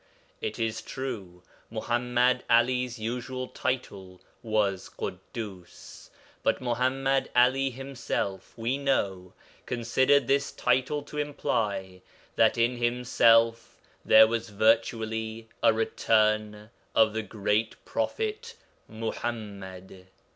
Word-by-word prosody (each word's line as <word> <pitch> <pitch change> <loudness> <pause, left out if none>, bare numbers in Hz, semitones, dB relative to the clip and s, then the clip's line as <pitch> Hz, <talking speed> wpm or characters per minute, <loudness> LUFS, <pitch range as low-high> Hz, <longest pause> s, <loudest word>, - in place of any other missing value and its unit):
It 110 - -3
is 115 -1 -2
true, 100 -10 -6 0.3
Muḥammad 125 +2 +1
'Ali's 125 +1 +2
usual 125 +3 -4
title 100 -9 -4 0.2
was 105 -4 0
Ḳuddus, 100 -6 -8 0.3
but - - +1
Muḥammad 130 +2 0
'Ali 130 +2 +4
himself, 125 -7 -4
we 120 +4 -1
know, 95 -10 -1 0.3
considered 130 +4 +2
this 140 +1 +1
title 130 +4 0
to 150 +1 -7
imply 105 -10 -2 0.3
that - - +4
in 120 +1 +2
himself 115 -1 +3 0.2
there 110 0 +8
was 115 0 -2
virtually 110 +1 0
a - - +6
'return' 110 -1 +1 0.2
of 110 -1 +5
the 110 - -1
great 105 +1 -1
prophet 445 +2 -3 0.3
Muḥammad. 100 -5 -6
115 Hz, 95 wpm, -28 LUFS, 110-125 Hz, 0.3 s, there